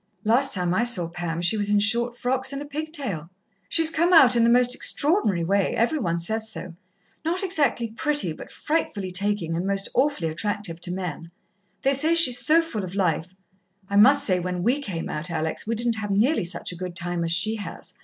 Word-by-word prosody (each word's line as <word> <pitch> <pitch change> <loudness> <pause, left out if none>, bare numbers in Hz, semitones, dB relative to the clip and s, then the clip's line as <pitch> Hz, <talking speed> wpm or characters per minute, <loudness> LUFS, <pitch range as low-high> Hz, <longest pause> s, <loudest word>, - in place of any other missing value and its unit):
"Last 245 +5 +2
time 180 -2 -1
I 220 - +1
saw 215 -9 +3
Pam 170 0 -5
she 175 +5 +4
was 205 -1 0
in 205 0 +3
short 235 +3 +1
frocks 260 +2 -1
and 275 - -5
a 290 - -7
pigtail." 285 - -5 0.4
"She's 325 -1 +4
come 340 +3 +1
out 260 -7 +7
in 235 - +3
the 230 - +4
most 245 +1 +4
extraordinary 270 - +1
way. 195 +3 0
Every 240 +8 0
one 170 -8 -1
says 220 +6 -1
so. 185 -5 -6 0.5
Not 345 +4 0
exactly 285 - 0
pretty, 290 - +1
but - - -11
frightfully 205 - -3
taking, 195 -3 0
and 175 +3 -2
most 195 0 -1
awfully 260 - 0
attractive 175 0 -3
to 175 - -2
men. 180 -3 -6 0.5
They 275 - +2
say 310 +5 +3
she's 255 -7 +6
so 325 +2 +3
full 225 -11 -5
of 185 +1 -7
life. 180 -1 -1 0.5
I 200 - -3
must 275 +7 +5
say, 185 -3 +2
when 180 0 -4
we 255 +7 +1
came 180 -11 -5
out, 155 +4 -5
Alex, 160 +3 -3
we 230 - -1
didn't 235 0 0
have 210 -1 -5
nearly 215 - +1
such 170 0 -2
a - - -8
good 180 0 -7
time 175 0 -3
as 165 - -2
she 215 +6 0
has. 205 - -9
210 Hz, 210 wpm, -24 LUFS, 175-265 Hz, 0.5 s, out